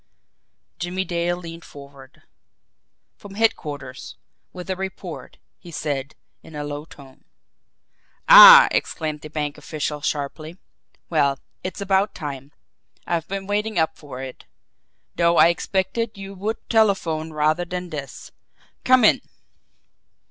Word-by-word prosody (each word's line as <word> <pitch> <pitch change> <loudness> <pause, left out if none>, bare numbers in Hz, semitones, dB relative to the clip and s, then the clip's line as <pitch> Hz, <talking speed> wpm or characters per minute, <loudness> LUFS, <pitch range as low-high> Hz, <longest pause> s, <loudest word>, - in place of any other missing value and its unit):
Jimmie 180 +2 -3
Dale 175 0 -1
leaned 165 -1 -10
forward. 140 -2 -15 0.9
"From 200 -1 -12
headquarters 145 - -2 0.4
with 180 0 -9
a - - -1
report," 190 0 -7 0.2
he 175 - -13
said, 145 -3 -4 0.3
in 160 - -14
a 150 - -4
low 145 +1 -6
tone. 135 -4 -16 1.0
"Ah!" - - +11
exclaimed 155 -2 -2
the 155 - -9
bank 150 -1 -4
official 150 -1 -4
sharply. 155 +3 -4 0.5
"Well, 140 -4 +2 0.3
it's 185 +1 -6
about 195 +1 +1
time! 140 -4 -7 0.5
I've 170 -2 -2
been 195 0 -5
waiting 210 +1 -2
up 160 -1 +1
for 135 -3 -9
it 130 -1 -10 0.7
though 170 0 +3
I - - +7
expected 195 +5 -2
you 195 0 -8
would 205 +4 -3
telephone 185 -8 +1
rather 155 +3 +1
than 180 0 -6
this. 145 -3 -8 0.5
Come 255 -1 +4
in!" - - +4
170 Hz, 125 wpm, -22 LUFS, 150-190 Hz, 1.0 s, Ah